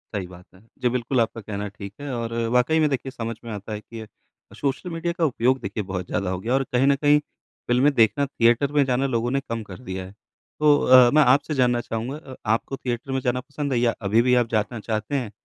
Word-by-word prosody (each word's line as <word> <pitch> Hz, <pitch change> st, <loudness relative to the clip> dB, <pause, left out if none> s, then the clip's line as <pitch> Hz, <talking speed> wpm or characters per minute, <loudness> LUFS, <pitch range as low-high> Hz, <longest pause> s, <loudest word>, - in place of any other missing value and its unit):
सही 95 Hz, -3 st, -3 dB
बात 90 Hz, 0 st, -14 dB
है। 95 Hz, -, -19 dB, 0.2 s
जी, 125 Hz, -, +2 dB
बिल्कुल 125 Hz, +1 st, -1 dB
आपका 115 Hz, 0 st, -2 dB
कहना 105 Hz, -1 st, -5 dB
ठीक 100 Hz, 0 st, -9 dB
है 145 Hz, -1 st, -5 dB
और 115 Hz, -1 st, -4 dB, 0.2 s
वाक़ई 125 Hz, +6 st, +3 dB
में 155 Hz, -2 st, +3 dB
देखिए 135 Hz, -1 st, -3 dB
समझ 115 Hz, -2 st, -5 dB
में 115 Hz, -, -7 dB
आता 105 Hz, +1 st, -6 dB
है 105 Hz, -, -4 dB
कि 115 Hz, +1 st, -10 dB
अ, 110 Hz, -, -9 dB, 0.5 s
सोशल 145 Hz, +6 st, -2 dB
मीडिया 170 Hz, +1 st, -2 dB
का 170 Hz, -1 st, 0 dB
उपयोग 130 Hz, -1 st, +1 dB
देखिए 100 Hz, +2 st, -4 dB
बहुत 95 Hz, -1 st, -4 dB
ज़्यादा 100 Hz, -3 st, -2 dB
हो 95 Hz, 0 st, -2 dB
गया 115 Hz, +6 st, -2 dB
और 135 Hz, -, +2 dB
कहीं 130 Hz, +2 st, +3 dB
न 140 Hz, -, +5 dB
कहीं 145 Hz, +1 st, +4 dB, 0.5 s
फ़िल्में 125 Hz, +4 st, +4 dB
देखना, 115 Hz, +3 st, +3 dB
थिएटर 125 Hz, +1 st, +2 dB
में 145 Hz, -1 st, +3 dB
जाना 130 Hz, +1 st, +1 dB
लोगों 120 Hz, -1 st, -1 dB
ने 135 Hz, -, +1 dB
कम 115 Hz, -1 st, -3 dB
कर 105 Hz, -, -11 dB
दिया 95 Hz, -6 st, -6 dB
है, 95 Hz, -, -11 dB, 0.5 s
तो 150 Hz, -1 st, +5 dB
अ, 125 Hz, -1 st, +7 dB
मैं 150 Hz, 0 st, +6 dB
आपसे 140 Hz, +4 st, +3 dB
जानना 125 Hz, -2 st, +2 dB
चाहूँगा 120 Hz, +6 st, -4 dB
अ, 135 Hz, -4 st, -11 dB
आपको 115 Hz, +5 st, -1 dB
थिएटर 125 Hz, 0 st, -4 dB
में 135 Hz, -, 0 dB
जाना 125 Hz, +1 st, 0 dB
पसंद 140 Hz, +1 st, -4 dB
है 120 Hz, -, +2 dB
या 120 Hz, -1 st, +2 dB
अभी 105 Hz, +3 st, +3 dB
भी 125 Hz, 0 st, +3 dB
आप -, -, -11 dB
जाना 110 Hz, +2 st, -1 dB
चाहते 110 Hz, +5 st, -3 dB
हैं? 120 Hz, -6 st, -2 dB
120 Hz, 245 wpm, -24 LUFS, 110-135 Hz, 0.5 s, अ